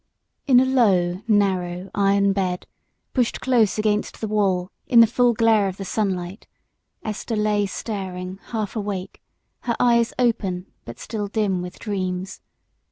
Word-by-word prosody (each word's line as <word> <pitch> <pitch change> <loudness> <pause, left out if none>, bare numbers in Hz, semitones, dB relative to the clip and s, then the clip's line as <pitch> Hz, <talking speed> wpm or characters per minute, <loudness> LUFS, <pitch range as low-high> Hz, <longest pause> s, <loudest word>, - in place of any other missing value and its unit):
And 255 -3 +7
in 260 - +3
a - - -1
low, 185 -7 +3
narrow 190 -3 +1
iron 200 0 +3
bed, 185 -2 -2 0.5
pushed 245 -3 0
close 235 -6 +2
against 210 -1 0
the 220 - -3
wall 195 -3 0 0.2
in 245 -3 +6
the 230 - +10
full 240 +2 +2
glare 220 -2 +3
of 190 0 -5
the 195 - -6
sunlight, 190 -1 -3 0.6
Esther 215 +1 -3
lay 210 -1 +1
staring 190 -3 -5
half 220 -2 -3
awake, 200 -3 -4 0.4
her 235 - -2
eyes 235 -1 +3
open 200 -7 0 0.2
but 115 - -9
still 210 -3 -4
dim 200 -3 0
with 180 0 -7
dreams. 185 -2 -4
205 Hz, 150 wpm, -23 LUFS, 185-225 Hz, 0.6 s, the